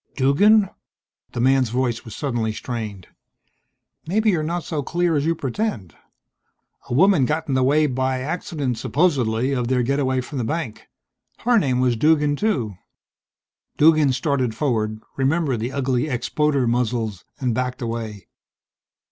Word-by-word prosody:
"Duggan?" 195 +11 +4 0.7
The - - -4
man's 130 0 +3
voice 120 -1 -1
was 115 - -9
suddenly 120 -6 -1
strained. 110 -6 -6 1.0
"Maybe 215 +5 +2
you're 170 -4 0
not 170 +2 -2
so 155 -3 -3
clear 170 +3 0
as 145 +1 0
you 165 - +2
pretend. 135 - -3 1.0
A - - -2
woman 180 -3 +5
got 155 +4 -1
in 140 - -1
the 130 - +2
way 145 +4 +3
by 130 -1 -1
accident, 145 -4 -3
supposedly, 130 -7 +1
of 125 -3 -1
their 125 0 +1
getaway 130 0 0
from 135 +2 -6
the - - -1
bank. 115 -5 -4 0.5
Her 240 -1 +4
name 130 -7 +1
was 125 -2 +2
Duggan 150 +3 +3
too." 125 - -1 1.0
Duggan 155 -2 +5
started 130 -3 0
forward, 110 -7 -1 0.2
remembered 140 -2 +1
the 120 +4 -3
ugly 130 -1 0
expoder 140 +2 0
muzzles 115 -5 -1 0.2
and 125 -3 0
backed 125 +1 -2
away. 115 -4 -5
130 Hz, 145 wpm, -22 LUFS, 120-155 Hz, 1.0 s, woman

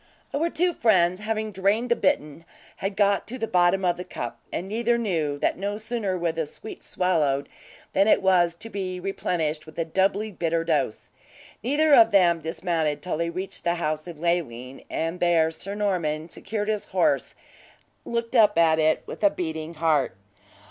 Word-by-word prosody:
Our 325 +4 +1
two 355 +2 +1
friends 185 - +3
having 215 0 -2
drained 205 +5 0
the - - +5
bitten, 155 -6 0 0.3
had 195 +1 -3
got 200 -1 +2
to 255 - -5
the 225 -2 -2
bottom 180 +1 +3
of 175 -1 +1
the 180 - -5
cup, 180 - -6
and 180 - -3
neither 235 +3 +1
knew 165 -10 -1
that 145 - 0
no 205 +1 -2
sooner 215 -4 -2
were 170 -1 0
the 160 -1 -3
sweets 220 - -8
swallowed, 150 -7 +1 0.5
than 195 +2 +3
it - - +4
was 175 -3 +3
to 225 +6 -8
be 185 -2 -4
replenished 165 -5 -2
with 155 - -13
a 165 - 0
doubly 195 +5 0
bitter 165 -2 -1
dose. 150 -9 -1 0.5
Neither 290 +5 +2
of 225 -4 +8
them 180 -5 +4
dismounted 160 -2 -1
till 180 -4 -2
they 170 +1 -1
reached 185 +3 -4
the 170 0 +1
house 155 -1 -2
of 170 -3 -8
Leoline, 135 -7 -2
and 165 +2 -2
there 165 -2 +3
Sir 195 +5 -6
Norman 170 -6 -1
secured 210 +4 -3
his 215 -1 -1
horse, - - +1 0.7
and - - -9
looked 235 +2 -2
up 210 -4 +5
at 160 -1 +4
it 155 0 +2
with - - -8
a 205 - +7
beating 160 -2 -5
heart. 155 - +1
180 Hz, 185 wpm, -25 LUFS, 160-205 Hz, 0.7 s, of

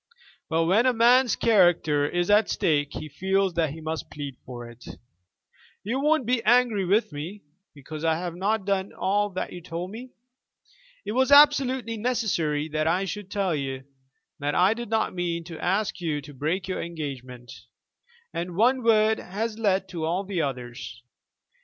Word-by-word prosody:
But 165 0 +1
when 210 +9 +3
a 255 - +3
man's 245 +2 +4
character 175 -9 +3
is 175 +2 0
at 210 0 +4
stake 145 -3 0
he - - -6
feels 190 +5 0
that 165 -2 +1
he 160 +3 -8
must 160 0 -4
plead 140 -3 -7
for 120 -2 -7
it. 120 0 -14 1.0
You 235 +6 -2
won't 300 -2 +2
be 240 0 +1
angry 235 -3 +3
with 205 +3 +2
me 170 +8 -7 0.3
because 150 +2 -8
I 160 -1 +2
have 175 +1 -4
not 200 +3 -1
done 195 -1 -1
all 205 +2 0
that 185 - -4
you 175 - -8
told 175 +2 -6
me? 245 +4 -9 1.0
It - - -3
was 260 +4 +2
absolutely 265 -5 +5
necessary 195 -11 0
that 155 +1 -1
I 180 +4 +1
should 195 +1 -6
tell 195 -4 0
you 135 -3 -3 0.6
that 145 0 -1
I 185 +4 +4
did 235 -1 -7
not 220 -3 0
mean 170 -2 -2
to 165 -1 -9
ask 195 +2 0
you 155 -4 -1
to 145 +1 -12
break 160 +8 -2
your 185 - -3
engagement, 130 -7 -7 0.8
and 175 +1 -4
one 250 +6 +3
word 220 -1 +3
has 215 +4 -4
led 195 -3 +1
to 170 -4 -5
all 175 +5 0
the 190 -3 -2
others. 125 -2 -5
185 Hz, 170 wpm, -25 LUFS, 155-220 Hz, 1.0 s, absolutely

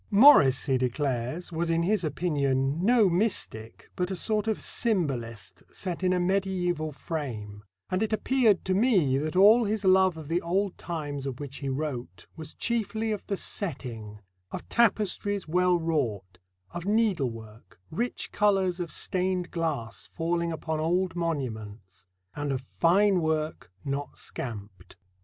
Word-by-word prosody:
Morris 200 - +7
he 135 -3 +1
declares, 130 +5 -2
was 165 +1 -1
in 165 0 +2
his 200 +1 +1
opinion 145 -2 0
"no 230 -1 +5
mystic, 170 - -2
but 180 0 -1
a 190 - -2
sort 215 +4 -1
of 220 - 0
symbolist 135 - -2
set 180 -3 -5
in 185 - +3
a 180 - +2
medieval 180 -4 0
frame, 115 -10 -6 0.3
and 185 +2 0
it 220 - 0
appeared 220 -2 +2
to 185 - +1
me 185 - +3
that 155 +3 -3
all 215 +5 +7
his 210 -1 -1
love 185 -2 +4
of 155 -2 -8
the 170 +3 0
old 190 +3 0
times 145 -5 -5
of 130 -2 -5
which 140 -1 -7
he 140 - -4
wrote 130 - -4
was 160 -1 -8
chiefly 225 -1 -1
of 210 - -3
the 200 - -1
setting; 115 - -4 0.3
of - - -7
tapestries 205 -4 +1
well 180 +2 +3
wrought; 110 - -2 0.3
of 175 - -5
needlework, 135 - -1
rich 240 +9 -3
colours 195 -3 +2
of 170 -3 -4
stained 185 -1 -1
glass 160 -10 -3
falling 170 0 -1
upon 160 -1 -3
old 180 +4 0
monuments, 110 - -4 0.3
and 145 -1 -2
of 130 -1 -3
fine 190 +3 +4
work 155 - -2
not 140 0 -4
scamped." 100 -6 -8
165 Hz, 145 wpm, -27 LUFS, 135-190 Hz, 0.3 s, Morris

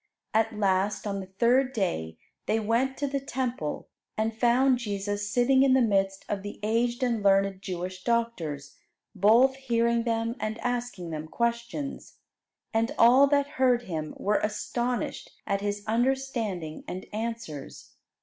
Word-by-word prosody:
At 220 0 +1
last, 200 0 +1
on 200 -1 -2
the 190 - -7
third 245 +7 +2
day, 80 - -2 0.3
they 220 - +2
went 235 +5 0
to 290 - -1
the 275 0 -1
Temple, 250 - -3 0.3
and 220 +1 0
found 245 +2 +3
Jesus 205 -2 -3
sitting 250 +4 +3
in 270 -1 +5
the - - +5
midst 195 -3 +1
of 200 -2 -2
the 205 +1 -8
aged 235 +3 +1
and 235 -3 +1
learned 195 -1 +3
Jewish 185 -1 -5
doctors, 180 -12 -2 0.3
both 230 +7 +5
hearing 235 -3 +1
them 230 0 -1
and 215 +1 -3
asking 240 -8 -3
them 155 0 -5
questions. 235 - -3 0.6
"And 225 +1 0
all 255 +4 +7
that 285 0 +3 0.2
heard 250 -2 +4
Him 160 -6 -5
were 210 +1 +1
astonished 240 +3 -2
at 200 -1 -1
His 205 0 -2
understanding 230 -8 -1
and 185 +1 -5
answers." 220 -10 -6
225 Hz, 145 wpm, -27 LUFS, 195-245 Hz, 0.6 s, all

